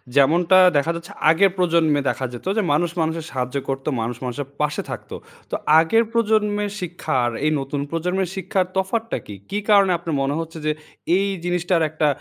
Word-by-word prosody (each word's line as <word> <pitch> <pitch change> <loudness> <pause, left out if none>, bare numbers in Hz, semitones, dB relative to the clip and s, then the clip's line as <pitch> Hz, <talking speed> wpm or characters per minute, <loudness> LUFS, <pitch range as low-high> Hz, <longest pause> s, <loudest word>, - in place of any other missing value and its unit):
যেমনটা 165 +6 +5 0.2
দেখা 145 +4 +1
যাচ্ছে 170 +3 -8 0.2
আগে 170 +5 +5
প্রজন্মে 165 -4 +3
দেখা 130 - -2
যেত। 120 - -9
যে - - +4
মানুষ 170 +3 +1
মানুষের 160 0 -2
সাহায্য 125 0 -3
করতো, 135 +2 -2
মানুষ 120 +1 -3
মানুষের 130 +2 -4
পাশে 150 0 0
থাকতো। - - -7 0.4
তো - - 0 0.2
আগের 225 +8 +3
প্রজন্মের 210 -3 +1
শিক্ষা 175 0 -4
আর 120 - 0
এই 155 - +3
নতুন 140 +1 -3
প্রজন্মের 180 +2 -1
শিক্ষার 190 0 0
তফাৎটা 220 +4 -1
কি? 105 - -7
কি 205 - -1
কারণে 200 -2 +6
আপনার 165 -3 -4
মনে 135 +1 0
হচ্ছে 165 0 -6
যে 155 - +2 0.5
এই 195 - +1 0.2
জিনিসটার 175 -1 +1
একটা 155 0 0
165 Hz, 175 wpm, -22 LUFS, 145-190 Hz, 0.5 s, কারণে